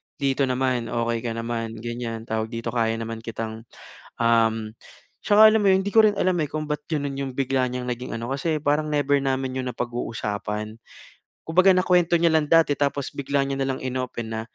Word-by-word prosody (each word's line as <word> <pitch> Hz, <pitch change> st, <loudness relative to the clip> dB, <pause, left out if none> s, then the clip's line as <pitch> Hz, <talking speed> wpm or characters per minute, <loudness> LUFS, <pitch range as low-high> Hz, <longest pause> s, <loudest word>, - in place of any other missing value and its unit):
Dito 140 Hz, -1 st, 0 dB
naman 125 Hz, -2 st, 0 dB
okey 115 Hz, 0 st, -1 dB
ka 115 Hz, 0 st, -4 dB
naman 115 Hz, -1 st, -4 dB
ganyan 120 Hz, -1 st, -4 dB
tawag 110 Hz, -1 st, -2 dB
dito 115 Hz, 0 st, -5 dB
kaya 115 Hz, -1 st, 0 dB
naman 115 Hz, 0 st, -5 dB
kitang 115 Hz, 0 st, -6 dB, 0.6 s
um 115 Hz, -2 st, +2 dB, 0.5 s
at -, -, -26 dB
saka 215 Hz, +1 st, +8 dB
alam 220 Hz, -, +3 dB
mo 200 Hz, -, +2 dB
iyon 190 Hz, 0 st, +4 dB
di 200 Hz, -, -3 dB
ko 225 Hz, -, +5 dB
rin 205 Hz, -, 0 dB
alam 185 Hz, -1 st, +2 dB
eh, 155 Hz, -, 0 dB
kung 155 Hz, +2 st, -4 dB
bakit 150 Hz, +1 st, -3 dB
ganoon 145 Hz, -1 st, -2 dB
iyong 135 Hz, -2 st, -4 dB
bigla 130 Hz, -1 st, +1 dB
niyang 125 Hz, 0 st, -4 dB
naging 125 Hz, 0 st, -5 dB
ano 115 Hz, +3 st, -5 dB
kasi 155 Hz, +4 st, -1 dB
parang 150 Hz, +1 st, +1 dB
never 145 Hz, -1 st, +2 dB
namin 135 Hz, -1 st, -1 dB
iyon 130 Hz, -, -3 dB
napag-uusapan. 110 Hz, -3 st, -4 dB, 0.7 s
Kumbaga 185 Hz, +4 st, +5 dB
nakuwento 180 Hz, -2 st, +3 dB
niya 170 Hz, -, +5 dB
lang 160 Hz, -2 st, +1 dB
dati 165 Hz, -3 st, +5 dB
tapos 140 Hz, -1 st, -1 dB
bigla 140 Hz, 0 st, 0 dB
niya 135 Hz, -, -2 dB
na 135 Hz, -, -1 dB
lang 130 Hz, -, -6 dB
in-open 125 Hz, -3 st, -4 dB
na 110 Hz, 0 st, -3 dB
130 Hz, 200 wpm, -24 LUFS, 115-150 Hz, 0.7 s, saka